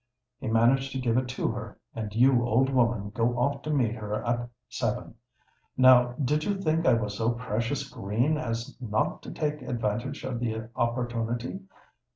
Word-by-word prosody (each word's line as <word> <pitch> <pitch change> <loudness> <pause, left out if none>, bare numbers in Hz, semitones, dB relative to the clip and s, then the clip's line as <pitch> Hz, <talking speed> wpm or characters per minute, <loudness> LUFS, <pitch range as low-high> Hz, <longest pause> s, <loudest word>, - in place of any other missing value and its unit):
He - - -5
managed 120 +5 +3
to 135 - -2
give 120 -3 +1
it 130 0 +1
to 125 - -1
her; - - -6 0.2
and 110 -2 -4
you, 125 +1 +5
old 120 +4 +2
woman, 115 -5 +1
go 115 +2 0
off 140 +3 0
to 155 - -6
meet 125 -7 +2
her 105 -2 -4
at 120 0 -1 0.2
seven. - - -2 0.6
Now 125 -1 +7
did 150 +3 0
you 200 +1 -1
think 165 -2 +1
I 120 - +6
was 105 -3 -2
so 115 +2 +1
precious 125 +3 -2
green 120 +5 0
as 115 -5 -3
not 110 -3 -1
to - - -8
take 150 -1 -2
advantage 120 +2 -2
of 120 - -3
the 110 -2 -3
opportunity? 120 +4 -1
120 Hz, 175 wpm, -28 LUFS, 115-135 Hz, 0.6 s, Now